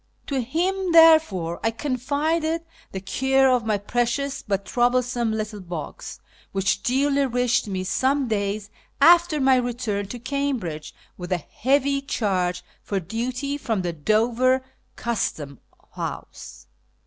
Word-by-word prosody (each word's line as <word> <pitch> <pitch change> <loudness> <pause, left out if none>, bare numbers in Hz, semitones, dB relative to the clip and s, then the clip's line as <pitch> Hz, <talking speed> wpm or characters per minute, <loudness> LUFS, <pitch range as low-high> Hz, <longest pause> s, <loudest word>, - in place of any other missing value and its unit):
To 275 -2 -1
him, 355 +8 -1
therefore, 315 - +5
I 225 - +3
confided 300 +7 -1 0.3
the 190 - -5
care 265 +7 +2
of 245 -3 +1
my 215 -1 +2
precious 245 +6 -1
but 200 -1 -2
troublesome 245 -1 +1
little 215 -1 -3
box, 170 -5 -7 0.3
which 195 +1 0
duly 275 +2 +2
reached 245 -2 +1
me 190 -2 -3
some 265 +8 +1
days 205 -1 -2 0.3
after 340 +1 +6
my 265 -1 +4
return 240 -5 -2
to 245 - -6
Cambridge, 240 - -3 0.2
with 180 +1 -7
a 180 - +2
heavy 275 - 0
charge 185 -9 -1 0.2
for 200 - -2
duty 250 - -3
from 220 -8 -1
the 175 -1 -2
Dover 235 - +2 0.3
Custom 150 - -3 0.3
House. - - -7
245 Hz, 125 wpm, -24 LUFS, 200-275 Hz, 0.3 s, after